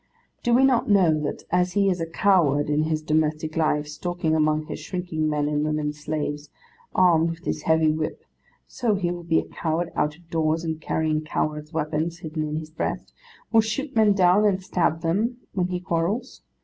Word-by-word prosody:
Do 240 -1 +2
we 265 +2 +5
not 250 -4 +2
know 190 -6 +5
that 145 - -4
as 180 0 +2
he 200 -1 +3
is 180 -3 0
a 165 - -2
coward 160 -5 +2
in 150 +1 +2
his 155 -1 -1
domestic 155 0 0
life, 150 -2 +1
stalking 170 +1 -2
among 155 0 +1
his - - -6
shrinking 165 -2 -2
men 150 -1 0
and 150 0 0
women 150 -1 -1
slaves 150 -1 -4 0.5
armed 170 -2 +4
with 165 +2 -7
his - - -2
heavy 160 -1 +3
whip, 155 0 -4 0.4
so 225 -4 -1
he 180 -3 -1
will 175 0 -5
be 165 -1 +1
a - - +1
coward 165 +1 -2
out 150 0 0
of 175 -1 -23
doors, 160 0 +1
and 160 -1 -3
carrying 155 -1 0
cowards' 150 0 -3
weapons 160 +1 -2
hidden 160 -1 -5
in 150 - -4
his 155 0 -5
breast, - - -4 0.4
will 225 -1 +6
shoot 270 +6 -3
men 215 -2 +5
down 190 +1 +4
and 195 -3 +2
stab 165 -3 0
them 210 +9 0 0.2
when 180 -2 0
he 180 -1 -3
quarrels? 180 +9 -2
160 Hz, 195 wpm, -24 LUFS, 155-180 Hz, 0.5 s, will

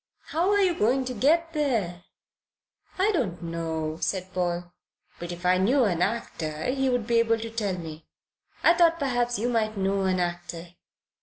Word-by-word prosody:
"How 340 +4 +1
are 410 0 +3
you 370 -3 +3
going 255 0 +1
to 255 - -3
get 325 +8 +2
there?" 220 - -1 0.9
"I 390 +3 +3
don't 220 - -1
know," 160 -1 -3
said 185 -1 -2
Paul, 175 -1 -2 0.5
"but 175 0 -5
if 175 +1 -8
I 185 0 +4
knew 250 +8 +3
an 175 -6 +1
actor, 160 -7 -2
he 270 0 0
would 245 -3 0
be 235 0 +3
able 230 0 +3
to 225 0 -6
tell 205 -5 -2
me. 160 -2 -8 0.6
I 335 - +7
thought 340 -1 +4
perhaps 245 -5 0
you 225 +4 -1
might 220 -3 0
know 195 0 0
an 185 -1 +1
actor." 175 -1 -4
210 Hz, 175 wpm, -26 LUFS, 175-260 Hz, 0.9 s, I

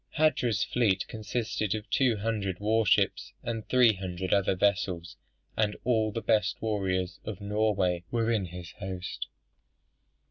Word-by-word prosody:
Hardrada's 130 -8 +2
fleet 105 -6 +1
consisted 110 -1 -2
of 105 0 -6
two 125 -5 +3
hundred 100 -3 -2
war 110 +1 +2
ships, 95 - +2
and 115 -2 -4
three 125 -3 +6
hundred 95 -1 -3
other 100 -1 +3
vessels, 90 -5 0 0.4
and 105 -1 +1
all 110 -3 +2
the 115 +2 -4
best 105 -1 +2
warriors 95 -4 -1
of 105 -4 -6
Norway 100 -4 +1
were 115 -1 +1
in 105 -5 +1
his 90 0 -8
host. 90 -1 -5
105 Hz, 140 wpm, -29 LUFS, 95-110 Hz, 0.4 s, three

